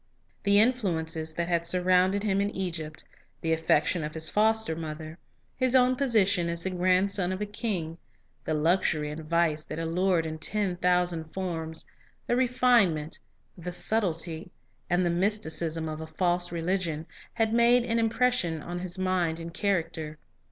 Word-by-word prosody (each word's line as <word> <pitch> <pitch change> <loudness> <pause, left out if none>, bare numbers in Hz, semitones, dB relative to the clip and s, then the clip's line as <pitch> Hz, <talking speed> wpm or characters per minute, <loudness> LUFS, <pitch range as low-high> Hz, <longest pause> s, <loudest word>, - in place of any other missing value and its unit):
The 200 0 +6
influences 165 -9 +1
that 170 0 -1
had 170 -1 +1
surrounded 185 +3 +2
him 200 -2 +1
in 200 - 0
Egypt, 160 -5 -4 0.4
the 165 0 +1
affection 160 +1 +2
of 150 +1 -5
his 160 0 -1
foster 220 -4 +2
mother, 155 +1 -7 0.4
his 255 0 +1
own 255 0 +5
position 205 -9 +2
as 170 0 -3
the 190 - -1
grandson 185 +1 +1
of 185 - -2
the 210 - -2
king, 190 -6 -3 0.4
the 155 - -1
luxury 155 -1 +1
and 155 +1 -7
vice 160 -1 +1
that 155 - -6
allured 165 +1 +1
in 160 0 -5
ten 200 0 -1
thousand 180 -2 +1
forms, 160 -2 -4 0.4
the 240 - +1
refinement, 240 -11 +2 0.4
the 180 0 -6
sub 220 +5 +1
tlety, 165 -2 -3 0.4
and 175 0 +2
the 175 - +2
mysticism 170 -4 -1
of 155 0 -5
a 160 - -6
false 175 0 0
religion, 170 -2 -1 0.3
had 225 -1 +1
made 235 +1 +5
an 230 -1 +1
impression 230 -7 +1
on 175 +3 -5
his 180 0 -6
mind 180 -3 0
and 165 0 -7
character. 165 -6 -1
175 Hz, 160 wpm, -28 LUFS, 160-200 Hz, 0.4 s, The